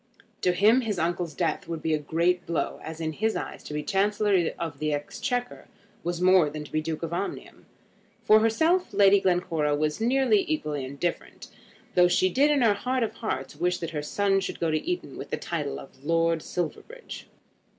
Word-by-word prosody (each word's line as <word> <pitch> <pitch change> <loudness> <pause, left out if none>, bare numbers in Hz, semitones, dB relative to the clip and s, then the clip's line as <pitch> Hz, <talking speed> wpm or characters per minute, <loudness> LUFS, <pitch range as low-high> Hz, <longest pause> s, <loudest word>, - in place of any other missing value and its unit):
To 180 - +3
him 215 +7 +5
his 215 -5 -2
uncle's 170 -1 -1
death 170 - -1
would 165 -2 -5
be 160 - +1
a 155 - +1
great 170 +4 0
blow, 170 -1 -2
as 160 0 -7
in 160 -1 -2
his 220 +6 0
eyes - - -5
to - - -8
be 150 - -2
Chancellor 200 -2 +2
of 165 -2 -5
the 155 0 -1
Exchequer 245 - -3 0.4
was 175 0 -2
much 185 +1 +4
more 175 -6 +5
than 150 +1 -6
to - - -13
be 155 - 0
Duke 160 +1 -4
of 165 0 -3
Omnium. 185 +3 -5 0.6
For 215 - +6
herself 320 +12 +2
Lady 200 0 +6
Glencora 175 -5 +1
was 150 +5 -1
nearly 270 - +3
equally 150 - -2
indifferent, 140 +6 -4 0.4
though 180 -1 +6
she 180 +1 +3
did 275 +10 +3
in 290 -4 +3
her 220 -3 +5
heart 250 +4 -1
of 225 - -2
hearts 220 - -4
wish 180 0 +1
that 165 -1 -5
her 150 -2 -3
son 195 +6 +1
should 195 - -5
go 165 -1 0
to 155 - 0
Eton 360 0 -4
with - - -7
the - - -2
title 150 -5 -3
of 135 - -14
Lord 165 +1 +1
Silverbridge. 180 - -6
175 Hz, 200 wpm, -26 LUFS, 160-215 Hz, 0.6 s, For